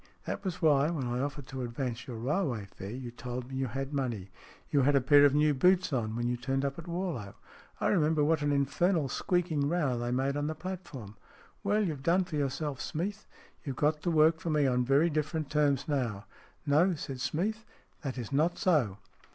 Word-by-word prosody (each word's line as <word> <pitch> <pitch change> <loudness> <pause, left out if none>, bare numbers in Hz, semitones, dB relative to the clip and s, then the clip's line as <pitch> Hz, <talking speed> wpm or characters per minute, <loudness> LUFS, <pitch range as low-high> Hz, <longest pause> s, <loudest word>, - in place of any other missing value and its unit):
That - - -4
was 180 -2 -4
why, 145 -1 +4
when 155 -6 -2
I 120 0 -1
offered 140 0 -3
to 130 -1 -5
advance 120 0 -4
your 120 -3 -6
railway 130 - -1
fare, 100 0 -9
you 120 +1 -6
told 125 +1 -6
me 135 - -6
you 130 0 -1
had 135 +4 -4
money. 115 -9 -2 0.4
You 145 - +4
had 140 +2 +3
a - - +6
pair 145 +2 +6
of 140 0 +4
new 150 0 +4
boots 180 +4 +3
on 110 -4 -1
when 120 0 -1
you 120 0 0
turned 135 +2 -1
up 140 +3 -3
at 170 - -9
Warlow. 170 - -3 0.4
I - - +1
remember 155 -4 +3
what 155 +1 +2
an 145 0 +1
infernal 145 +3 +1
squeaking 165 -4 0
row 150 -8 0
they 120 0 -2
made 135 +3 0
on 145 0 -1
the 155 - -3
platform. 155 - -7 0.5
Well, 210 +1 +2
you've 150 -6 -3
done 175 +6 +3
for 175 -3 -6
yourself, 140 0 -2
Smeath. 195 +7 -4 0.4
You've 135 -3 -4
got 150 +3 +1
to 175 - -1
work 160 0 +4
for 170 - -4
me 150 -2 +3
on 125 -1 +2
very 140 +6 +3
different 155 0 -2
terms 145 -3 +2
now." 120 -9 -1 0.2
" - - -32
No," 160 +6 +3
said 135 -4 -6
Smeath. 215 +10 -1 0.2
" - - -37
That 135 -5 -4
is 120 +1 -5
not 155 +5 +2
so." 150 - +2
145 Hz, 215 wpm, -30 LUFS, 130-160 Hz, 0.5 s, a